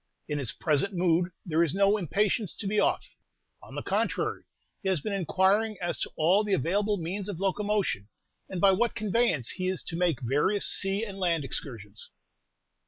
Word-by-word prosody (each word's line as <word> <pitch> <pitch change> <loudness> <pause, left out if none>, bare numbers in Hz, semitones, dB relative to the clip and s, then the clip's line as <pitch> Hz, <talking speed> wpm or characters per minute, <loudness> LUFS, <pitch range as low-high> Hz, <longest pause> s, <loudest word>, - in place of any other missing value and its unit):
"In 150 -1 -2
his 130 -5 +1
present 170 +6 0
mood 175 0 +2 0.2
there 165 -1 +2
is 165 -1 0
no 200 +1 +4
impatience 205 +1 0
to - - -5
be 205 +2 +1
off; - - +1 0.6
on - - -12
the - - -4
contrary, - - -1 0.4
he 195 - -1
has 185 -4 +2
been 205 +8 -4
inquiring 195 +4 +2
as 175 -1 -2
to - - -2
all 180 +7 +3
the 205 -2 +1
available 200 +7 0
means 190 +4 -4
of 185 -5 -5
locomotion, 195 - 0 0.4
and 185 - -4
by 195 +2 +6
what 235 +5 +1
convenience 215 - +1
he 185 - -3
is 185 -1 -2
to 165 - -5
make 170 -6 +1
various 150 - +1
sea 195 +3 0
and 195 -2 -8
land 170 -5 +1
excursions." 110 -6 -6
190 Hz, 180 wpm, -28 LUFS, 165-205 Hz, 0.6 s, by